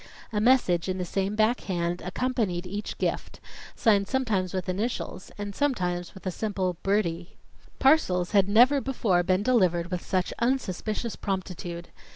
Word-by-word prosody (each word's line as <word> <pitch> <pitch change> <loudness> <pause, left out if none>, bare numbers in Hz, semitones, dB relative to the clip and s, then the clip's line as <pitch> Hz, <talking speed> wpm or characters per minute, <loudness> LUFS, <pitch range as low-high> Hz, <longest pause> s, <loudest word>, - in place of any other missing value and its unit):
A 210 - +1
message 210 -8 +3
in 185 - -1
the 180 - -2
same 195 +3 -1
back 220 +3 +2
hand 175 -2 -2
accompanied 195 -3 -1
each 205 +3 -5
gift, - - -3 0.4
signed 200 -3 +3
sometimes 215 -8 0
with 185 -1 -3
initials, 195 0 -3
and 205 -1 -5
sometimes 180 -11 -1
with 190 - -13
a 185 - -1
simple 185 -3 -2
"Bertie." 180 -4 -1 0.4
Parcels 185 - +3
had 200 -2 +3
never 250 +7 +5
before 220 -10 +1
been 185 +2 +1
delivered 180 -8 +2
with 180 -1 -3
such 185 -2 -1
unsuspicious 235 -2 -1
promptitude. 180 -3 -4
195 Hz, 150 wpm, -27 LUFS, 180-225 Hz, 0.4 s, never